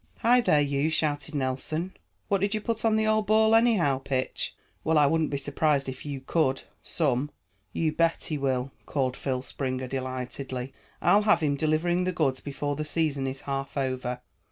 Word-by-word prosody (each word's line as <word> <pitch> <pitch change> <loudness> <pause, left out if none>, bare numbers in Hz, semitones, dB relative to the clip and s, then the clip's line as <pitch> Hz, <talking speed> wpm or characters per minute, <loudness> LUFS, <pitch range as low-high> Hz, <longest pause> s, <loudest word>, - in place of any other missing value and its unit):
"Hi 245 +2 +5
there, 155 -10 +3
you!" 140 +1 +1
shouted 150 -1 -1
Nelson. 145 +6 -2 0.3
"What 200 -2 +1
did 200 +2 +1
you 215 - -2
put 225 +1 -2
on 225 -1 +3
the 220 0 +2
old 215 -1 +2
ball, 220 +1 +4
anyhow? 215 - +4
Pitch? 135 -1 -2 0.3
Well, 160 0 +2
I 150 - +6
wouldn't 160 +2 +2
be 140 - -1
surprised 140 0 +1
if 130 +2 -6
you 140 -2 -4
could, 135 -1 0 0.2
some." 145 -3 0 0.4
"You 160 +6 0
bet 165 +1 +1
he 155 - -2
will," 130 -1 -1 0.2
called 130 -3 0
Phil 130 -2 -2
Springer 130 -1 -3
delightedly. 130 0 -4 0.3
"I'll 205 - +5
have 210 -6 +3
him 145 -2 +2
delivering 160 +4 +1
the 185 - +1
goods 145 -7 0
before 145 +1 -3
the 155 - -3
season 150 -3 0
is 135 +1 -4
half 140 0 -4
over." 130 -2 -2
145 Hz, 180 wpm, -27 LUFS, 135-170 Hz, 0.4 s, I